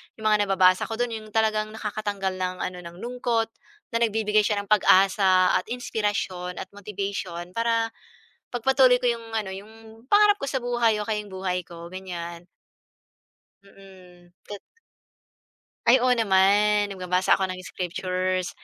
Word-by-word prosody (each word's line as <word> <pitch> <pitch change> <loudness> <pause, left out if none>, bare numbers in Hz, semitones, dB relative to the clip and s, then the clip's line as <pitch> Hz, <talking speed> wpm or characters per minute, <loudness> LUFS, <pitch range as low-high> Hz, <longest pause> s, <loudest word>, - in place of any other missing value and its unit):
yung 215 -1 -1
mga 205 -1 +3
nababasa 185 -1 +3
ko 225 - -4
do'n, 245 +1 -1
yung 220 -1 -6
talagang 215 -1 +1
nakakatanggal 205 -3 -3
ng 185 0 -2
ano, 185 0 -4
ng 170 0 -9
lungkot, 240 -2 -1 0.4
na 230 - 0
nagbibigay 215 -2 +2
siya 205 -2 0
ng 200 - -19
pag-asa 190 -2 +4
at - - -9
inspirasyon 205 -6 -3
at 190 - -7
motivation 195 -3 -5
para 230 +2 0 0.6
ipagpatuloy 255 +1 +4
ko 245 - -1
yung 230 -1 -2
ano, 200 -3 -2
yung 220 +3 -13
pangarap 415 0 +6
ko - - -1
sa 265 - 0
buhay 240 -2 +1
o - - -2
kaya 210 -1 -1
yung 205 - -14
buhay 185 -1 -2
ko, 170 0 -11
ganyan. 175 -2 -7 1.2
Mm, 185 -3 -17 0.2
to 205 - -6 1.3
Ay, 245 +1 +6
oo 255 - +3
naman. 205 0 +3
Nagbabasa 185 -1 +1
ako 190 - 0
ng 185 0 -7
scriptures, 185 0 -2
205 Hz, 150 wpm, -25 LUFS, 185-225 Hz, 1.3 s, pangarap